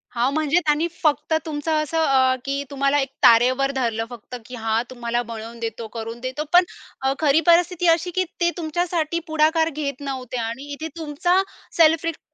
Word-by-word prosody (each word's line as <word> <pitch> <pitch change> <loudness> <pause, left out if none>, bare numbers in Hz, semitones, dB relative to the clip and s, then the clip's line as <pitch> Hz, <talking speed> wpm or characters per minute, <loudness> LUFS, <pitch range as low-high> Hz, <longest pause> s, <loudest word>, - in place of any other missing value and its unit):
हां, 245 +3 +1
म्हणजे 310 +2 +2
त्यांनी 300 +3 +2 0.2
फक्त 300 0 +1
तुमचं 305 0 -3
असं 315 +2 -3
अ, 260 -3 +3
की 275 +1 -2
तुम्हाला 275 +1 +1
एक 270 - -1
तारेवर 255 +4 +5
धरलं 230 -3 -1
फक्त 245 0 -9
की 250 +2 -9
"हां, 225 0 0
तुम्हाला 240 -1 -2
बनवून 230 +1 -7
देतो, 230 0 -5
करून 230 +1 -6
देतो." 260 +4 -4
पण 355 +1 +8 0.4
अ, 265 0 +1
खरी 310 0 +3
परिस्थिती 350 0 +3
अशी, 335 +2 +2
की 370 - +2 0.2
ते 345 - +4
तुमच्यासाठी 335 0 -1
पुढाकार 315 +1 +2
घेत 285 -3 -4
नव्हते 255 -2 -5
आणि 230 +3 -4
इथे 315 +3 -5
तुमचा 330 +4 +1 0.4
सेल्फ 325 0 +5
रिस्प 330 -1 -3
280 Hz, 175 wpm, -22 LUFS, 245-320 Hz, 0.4 s, पण